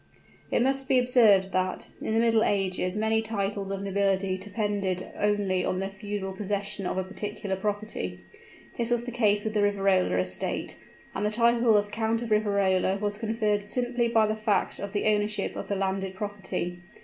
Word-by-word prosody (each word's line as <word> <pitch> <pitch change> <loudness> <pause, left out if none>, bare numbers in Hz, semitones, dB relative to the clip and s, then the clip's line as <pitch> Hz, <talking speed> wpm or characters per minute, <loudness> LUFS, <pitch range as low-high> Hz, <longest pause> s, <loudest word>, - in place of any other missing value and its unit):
It - - +2
must 270 0 0
be 265 -2 +4
observed 225 -7 +4
that, 185 0 -1
in 220 - -1
the - - +4
middle 225 -1 +4
ages 190 -1 0
many 220 +1 +2
titles 200 -2 -2
of 195 0 -3
nobility 195 -1 +1
depended 200 -2 -2
only 200 -3 +1
on 185 - -1
the 195 +1 -2
feudal 195 -1 -5
possession 200 -1 -3
of - - -2
a 190 - 0
particular 205 +1 -4
property. 205 +2 -3 0.6
This 235 0 +1
was 240 -1 +1
the 245 - -5
case 210 -3 +2
with 215 - -2
the 210 - +2
Riverola 195 - +2
estates; 90 0 -2 0.4
and - - -3
the 210 - +2
title 235 0 +4
of 205 0 -1
Count 225 +1 0
of 230 - -6
Riverola 200 -3 +2
was 205 0 -2
conferred 215 -2 0
simply 245 +2 0
by 225 -2 +4
the 215 0 0
fact 215 -2 0
of 200 0 -5
the 205 - -1
ownership 210 0 +1
of - - -5
the 200 - -1
landed 190 0 -2
property. 190 -3 -4
205 Hz, 180 wpm, -27 LUFS, 195-220 Hz, 0.6 s, be